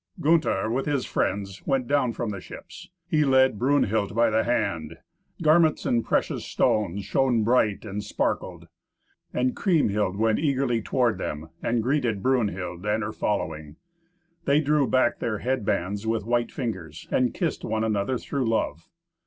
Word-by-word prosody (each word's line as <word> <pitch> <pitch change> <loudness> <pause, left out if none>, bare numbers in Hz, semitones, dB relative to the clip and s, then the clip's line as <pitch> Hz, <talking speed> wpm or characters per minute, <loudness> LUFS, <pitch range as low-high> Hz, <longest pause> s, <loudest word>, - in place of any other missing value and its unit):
Gunther, 150 -10 +2
with 135 +4 -1
his 140 -4 0
friends, 95 0 -2
went 135 -2 +1
down 140 -3 +2
from 115 -2 -3
the 100 -2 -6
ships; 175 - -11 0.2
he 155 -3 +2
led 130 -5 +3
Brunhild 110 -6 +1
by 115 -1 +3
the 110 +1 +2
hand; 85 -9 -1 0.5
garments 155 0 +4
and 115 -1 +1
precious - - 0
stones 100 -2 0
shone 125 -3 +2
bright 110 -3 +2
and 105 0 -4
sparkled. 105 - -2 0.6
And 125 0 0
Kriemhild 105 - +1
went 110 0 +2
eagerly 135 -6 +1
toward 120 -3 +1
them, 80 -2 -5
and 115 -1 0
greeted 120 -6 0
Brunhild 100 -9 -1
and 105 +1 0
her 110 - -3
following. 80 -9 -3 0.7
They 140 +2 +4
drew 150 -2 +2
back 130 -2 +2
their 115 -3 -2
head 125 -1 -2
bands 100 +1 -1
with 110 -2 -1
white 120 0 0
fingers, 95 - -5
and 125 -2 +2
kissed 170 -5 -2
one 110 0 -1
another 110 +3 0
through 130 -1 -2
love. 85 -7 -2
115 Hz, 155 wpm, -25 LUFS, 100-130 Hz, 0.7 s, garments